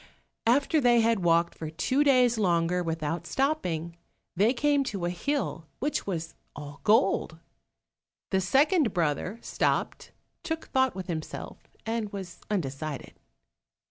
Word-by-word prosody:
After 285 +6 +3
they 240 -2 +5
had 225 -1 +2
walked 170 -1 +2
for 160 - -6
two 255 - +1
days 250 -5 +4
longer 175 -2 +2
without 165 0 -3
stopping, 170 - -1 0.4
they 205 +6 +4
came 285 +2 +2
to 195 -7 -3
a 175 - 0
hill 180 - -2
which 290 -2 -2
was 165 -4 -3 0.2
all 145 0 -9
gold. 195 -6 +3 0.9
The 190 -1 +2
second 275 - +3
brother 170 +5 0
stopped, - - -1 0.3
took 325 -2 -4
thought 260 -3 +2
with 190 -1 -5
himself, 160 -3 -6 0.3
and 225 -2 -2
was 190 -4 -8
undecided. 150 -6 -3
190 Hz, 130 wpm, -28 LUFS, 165-255 Hz, 0.9 s, they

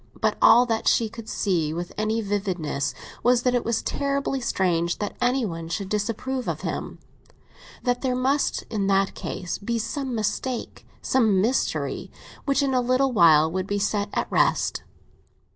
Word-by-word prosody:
But - - +1
all 240 +2 +7
that 225 -2 -1
she 225 -2 +3
could 225 0 -9
see 165 -8 0
with 175 +1 -5
any 215 +1 0
vividness 185 -9 -2 0.3
was 245 0 +3
that 250 - +2
it 245 - +1
was 230 -1 -1
terribly 280 -1 -1
strange 175 -6 0
that 205 - -4
anyone 220 -11 0
should 190 +3 -3
disapprove 230 +5 -2
of - - -2
him; - - -4 0.9
that 245 -1 0
there 255 -2 0
must 270 +3 +1
in 205 -3 0
that 195 0 +2
case 180 -2 -5
be 230 +3 -2
some 260 +2 -3
mistake, 225 +3 -3 0.2
some 220 -7 +3
mystery, 230 +7 -1 0.4
which 280 0 +2
in 270 -1 0
a 255 - +3
little 255 +2 +2
while 160 -7 +5
would 185 +1 -2
be 205 - -1
set 205 0 0
at - - 0
rest. - - +2
220 Hz, 160 wpm, -24 LUFS, 195-250 Hz, 0.9 s, all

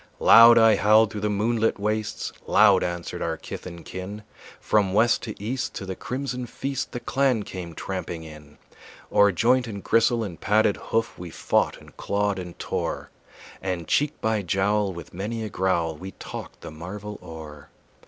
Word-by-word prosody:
Loud 115 +1 +8
I 115 -2 +6
howled 110 +1 +5
through 105 - -5
the 105 - 0
moonlit 110 +2 +1
wastes, 105 +1 -2
Loud 100 -2 +5
answered 85 -1 -4
our - - -2
kith - - -8
and 85 -1 -10
kin; 100 +3 -7 0.4
From 100 -3 +1
west 115 +3 +3
to 110 -2 -7
east 120 +6 -3
to 95 - -5
the 95 -1 -5
crimson 125 +1 -4
feast 135 +3 -4
The 120 - -4
clan 125 -2 +1
came 90 -4 -8
tramping 90 -2 -5
in. 75 -2 -13 0.5
O'er 100 0 +5
joint 125 +7 +2
and 100 -3 -7
gristle 115 0 +3
and 90 -6 -7
padded 105 0 +3
hoof 115 0 -1
We 90 -1 -7
fought - - 0
and - - -17
clawed 100 -1 -1
and 90 -2 -8
tore, - - -3 0.5
And 90 -4 -3
cheek 150 0 +1
by 110 -1 +1
jowl 100 +2 +1
with 85 -3 -10
many 110 +5 -4
a 110 - -4
growl 85 -5 0
We 95 +5 -9
talked - - -9
the - - -8
marvel 100 +6 -8
o'er. 75 -3 -10
105 Hz, 175 wpm, -25 LUFS, 90-115 Hz, 0.5 s, Loud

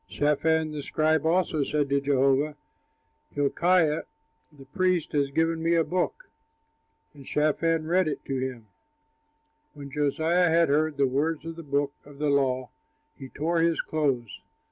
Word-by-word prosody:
Shaphan, 155 +2 +1
the 150 -1 -5
scribe, 155 +1 +1
also 165 -3 +1
said 145 +1 0
to 140 0 +1
Josiah, 140 +1 +2 0.7
"Hilkiah, 155 +2 +2 0.5
the 140 -3 -15
priest, 180 +3 0
has 140 -2 +1
given 160 +3 0
me 165 +1 +2
a 165 - +3
book." 185 - -2 0.9
And 140 -2 -13
Shaphan 155 +3 0
read 180 +2 +2
it 155 - -4
to 135 -1 -2
him. 130 -3 -5 1.1
When 140 -1 -9
Josiah 160 +5 +1
had 165 -1 +3
heard 150 +1 +1
the 140 - +3
words 150 +4 -1
of 165 0 -6
the 165 - -8
book 140 -1 -1
of 145 -1 -15
the 150 0 0
law, 130 -2 0 0.4
he 135 -3 -10
tore 165 +5 -1
his 165 0 +2
clothes. 125 -11 -2
150 Hz, 150 wpm, -26 LUFS, 140-165 Hz, 1.1 s, a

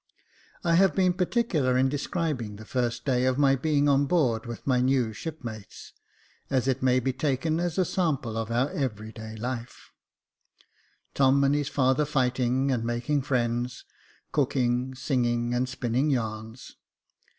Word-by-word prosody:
I 170 -2 +2
have 195 0 +4
been 185 -2 +3
particular 175 - +1
in 130 +1 +3
describing 145 - -2
the 110 +2 -11
first 120 -1 -2
day 130 -2 +2
of 130 0 +1
my 140 -2 +4
being 145 +1 +1
on 140 0 +3
board 125 -9 +1
with 120 -1 -7
my 125 -2 +2
new 125 -3 +1
shipmates, 115 -7 -8 0.6
as 130 -1 +1
it 135 0 0
may 130 0 +3
be 130 +1 -1
taken 145 +4 0
as 175 0 -2
a 185 - +3
sample 145 - -1
of 115 0 -3
our 120 +4 +1
86 - - -10
Jacob 175 - -3
Faithful - - +3
every 110 -3 -4
day 110 -1 -9
life; 120 0 -6 1.2
Tom 135 0 +4
and 140 +1 +3
his 145 -1 0
father 130 +1 +2
fighting 130 -1 +1
and 120 -3 0
making 120 +5 -1
friends, 120 -2 -1 0.5
cooking, 130 -2 0
singing, 120 -3 0
and 125 +1 0
spinning 130 +3 0
yarns. 110 -2 -4
130 Hz, 160 wpm, -27 LUFS, 120-145 Hz, 1.2 s, have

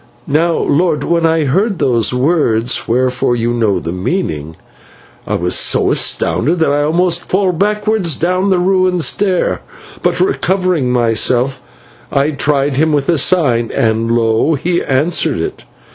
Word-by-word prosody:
"Now, 165 +4 +1
lord, 165 0 0
when 170 -1 +1
I 160 -1 +1
heard 195 - 0
those 120 -6 +1
words 125 -4 0
whereof 125 +2 0 0.2
you 120 +1 -1
know 110 -6 0
the 85 - -5
meaning, 85 - -3 0.7
I - - -1
was - - -1
so - - +2
astounded 155 +9 0
that 160 -3 +1
I 145 +1 +1
almost 170 +3 0
fell 190 0 0
backwards 210 -2 0
down 185 +5 0
the 190 - +2
ruined 185 -1 +1
stair, 190 0 0 0.4
but, - - 0
recovering 185 - 0
myself, 125 +2 +1 0.5
I 140 +2 +1
tried 140 -1 0
him 160 +2 +2
with 145 0 -1
a 165 -4 +3
sign, 130 -9 +1
and 115 0 0
lo, 115 +6 +1
he 175 +5 -1
answered 140 - 0
it. 80 - -5
150 Hz, 145 wpm, -14 LUFS, 120-180 Hz, 0.7 s, a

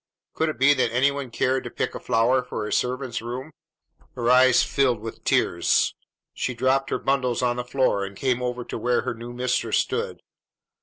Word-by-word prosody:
Could 160 - 0
it 155 - -5
be 135 +3 +5
that 130 -4 +1
any 130 +4 +3
one 140 -1 -4
had 120 - -16
cared 130 0 +1
to 120 - -6
pick - - -3
a - - -6
flower 125 +2 +2
for 125 -4 -5
a - - -3
servant's 125 -1 -1
room? 125 +6 -6 0.6
Her 120 -1 +1
eyes 130 0 +6
filled 130 -5 +1
with 115 +1 -8
tears; 85 0 +2 0.4
she 125 - -3
dropped 130 +3 +1
her - - 0
bundles 125 -3 0
on 120 0 +1
the 125 - -2
floor, 125 -5 +1
and 100 0 -7
came 125 -2 0
over 125 -1 -3
to - - -5
where 125 0 +1
her - - -3
new 115 +1 -9
mistress 125 +1 0
stood. - - -2
125 Hz, 205 wpm, -24 LUFS, 120-130 Hz, 0.6 s, eyes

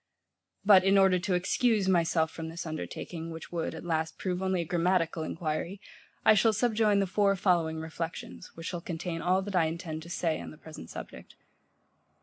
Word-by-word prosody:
But 195 -3 +8
in 195 +1 +4
order 190 -2 +5
to 185 +1 0
excuse 205 +3 +2
myself 165 -3 +2
from 160 -1 -6
this 170 +2 -6
undertaking, 160 +1 -5
which 160 -1 -8
would, 165 -2 -2
at 160 - -8
last, 160 -1 -1
prove 180 -1 -2
only 190 -2 +1
a - - -4
grammatical 170 -1 +1
enquiry, 160 +4 -3 0.5
I - - +8
shall 220 +2 +4
subjoin 215 -2 +2
the 195 - +2
four 195 +1 +2
following 175 -4 +1
reflections, 160 +3 -6
which 165 - -9
shall 175 -1 -4
contain 170 -1 -4
all 185 +2 +2
that 200 0 -5
I 170 -3 +4
intend 160 -1 -4
to 170 - -11
say 165 -2 -1
on - - -7
the 155 - -12
present 155 - -11
subject. - - -9
175 Hz, 185 wpm, -29 LUFS, 160-190 Hz, 0.5 s, But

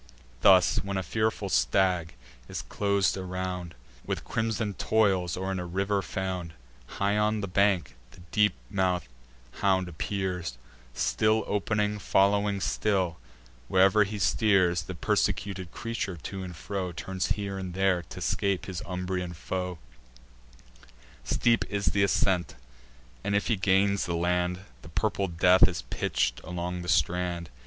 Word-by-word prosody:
Thus, 95 -2 +6
when 100 0 -2
a 95 - -1
fearful 110 +3 -1
stag 90 -3 +2 0.3
is - - -4
clos'd 100 -1 +1
around 90 -2 -4 0.3
With - - -3
crimson 110 -2 -1
toils, 95 -5 +1
or 95 +1 -2
in 95 - -2
a 90 - -4
river 100 +3 0
found, 90 -3 -4 0.4
High 100 +1 +1
on 105 0 +1
the 100 - -3
bank 95 -7 +2
the 65 - -16
deep 105 -2 +3 0.2
mouth'd 90 -4 0 0.5
hound 95 -2 +2
appears, 90 -4 -3 0.4
Still 110 0 +2
opening, 105 0 0
following 100 +1 +2
still, 95 -6 0 0.5
where'er 95 +3 +5
he 105 +1 -4
steers; 95 -2 +3
The 90 +2 -7
persecuted 95 +2 -1
creature, 110 -5 -4
to 95 +5 -6
and 90 -2 -7
fro, 95 +1 -4
Turns 95 +4 -2
here 100 -2 -4
and 90 -2 -6
there, 95 -2 +2
to - - -8
scape 100 -2 0
his 95 -3 -5
Umbrian 90 -1 -3
foe: 90 +1 -4 1.5
Steep 115 -1 +2
is 100 -5 0
th' - - -2
ascent, 95 -2 +2 0.7
and, 100 - 0
if 100 - +1
he 115 - +3
gains 100 0 +2
the 85 - -1
land, 90 +1 0 0.2
The 80 - -12
purple 100 +3 0
death 90 +2 +5
is 90 -2 -4
pitch'd - - -1
along 90 +1 -4
the 90 - -6
strand. 85 0 0
95 Hz, 140 wpm, -28 LUFS, 90-100 Hz, 1.5 s, Thus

